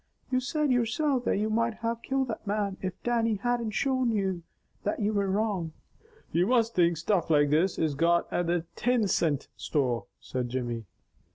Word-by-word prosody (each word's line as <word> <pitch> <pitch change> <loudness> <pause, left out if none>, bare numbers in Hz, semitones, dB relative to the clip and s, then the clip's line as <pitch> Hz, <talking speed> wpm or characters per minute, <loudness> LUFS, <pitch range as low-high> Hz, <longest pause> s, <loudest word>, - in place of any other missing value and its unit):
"You 255 - +3
said 290 +3 0
yoursilf 250 +2 +1
that - - +2
you 215 +2 0
might 230 0 +1
have 230 +1 -3
killed 265 -1 -1
that 220 - -5
man 200 -1 0
if 185 -1 -2
Dannie 230 -2 +1
hadn't 235 +2 -1
showed 255 +3 +1
you 190 -5 0 0.4
that 205 - -2
you 210 0 +1
were 200 -1 +1
wrong." 195 -5 -1 0.6
"You 175 +3 +2
must 230 -2 +3
think 170 -2 +3
stuff 175 +1 0
like 145 -2 +4
this 170 +5 +2
is 155 -2 +1
got 170 +4 +3
at 175 - 0
the 170 -1 0
tin 245 -4 +2
cint 155 -6 +1
store," 125 -6 -1
said 125 -1 -3
Jimmy. 120 -3 -3
205 Hz, 180 wpm, -28 LUFS, 170-235 Hz, 0.6 s, like